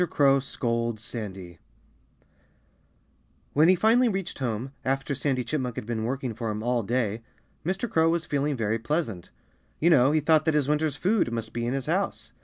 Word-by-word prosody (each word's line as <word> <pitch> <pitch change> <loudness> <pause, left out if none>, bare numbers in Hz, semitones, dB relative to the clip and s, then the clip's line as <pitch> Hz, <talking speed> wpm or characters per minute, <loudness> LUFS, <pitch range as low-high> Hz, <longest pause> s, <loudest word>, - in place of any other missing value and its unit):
CROW 140 -1 +4
SCOLDS 115 -4 -2
SANDY 95 -7 -7 1.9
When 155 +3 +5
he 185 - +6
finally 230 +6 +4
reached 195 -7 -4
home, 125 0 -2
after 135 +1 -1
Sandy 130 -1 -1
Chipmunk 125 -1 -2
had - - -5
been 110 -1 -2
working 130 -1 -2
for 115 0 -4
him 105 0 -3
all 120 0 +1
day, 115 0 -1 0.4
Mr. 190 +8 -1
Crow 165 -5 +3
was 165 0 0
feeling 145 -2 -1
very 110 0 0
pleasant. 115 - -2 0.5
You 170 +3 +4
know, 135 -3 +5
he 155 - +3
thought 155 +1 +3
that 160 -2 +2
his 145 -3 +2
winter's 150 -1 +1
food 190 - +1
must 115 -1 -4
be 120 0 -2
in 125 - -1
his 135 -2 -3
house. 185 +6 -2
135 Hz, 180 wpm, -26 LUFS, 115-155 Hz, 1.9 s, he